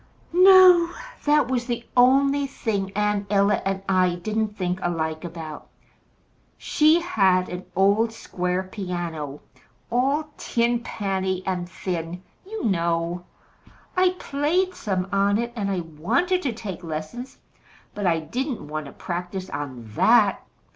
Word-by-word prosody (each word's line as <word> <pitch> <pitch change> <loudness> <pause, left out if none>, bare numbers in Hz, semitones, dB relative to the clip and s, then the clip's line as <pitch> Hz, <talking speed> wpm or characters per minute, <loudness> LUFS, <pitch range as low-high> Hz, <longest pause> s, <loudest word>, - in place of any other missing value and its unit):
"No. 365 -2 +8 0.4
That 295 0 +4
was 250 -1 -1
the 235 -1 -3
only 275 +3 +4
thing 200 -7 -3
Aunt 210 -1 0
Ella 200 0 +3
and 195 0 -2
I 185 -2 +3
didn't 215 +3 -2
think 180 -1 -1
alike 160 -2 -2
about. 160 -3 -8 0.9
She 310 +2 +3
had 190 - +2
an 180 +1 -6
old 200 +4 +3
square 180 -4 -2
piano, 175 -7 -5 0.5
all 280 +5 +1
tin 235 0 +1
panny 190 -4 -2
and 180 -2 -2
thin, 180 -1 -5 0.2
you 440 +1 -5
know. 170 -2 0 0.7
I 365 0 +3
played 340 +7 0
some 190 - -2
on 200 +1 +2
it, 235 +1 -3
and 180 -7 -3
wanted 345 - +1
to 275 - -1
take 205 -5 -7
lessons; 160 +11 -6 0.6
but 205 -2 -2
I 165 -2 +2
didn't 245 - -4
want 155 0 -5
to - - -11
practise 180 +1 -5
on 140 -4 -5
that. - - +4
195 Hz, 130 wpm, -24 LUFS, 175-245 Hz, 0.9 s, No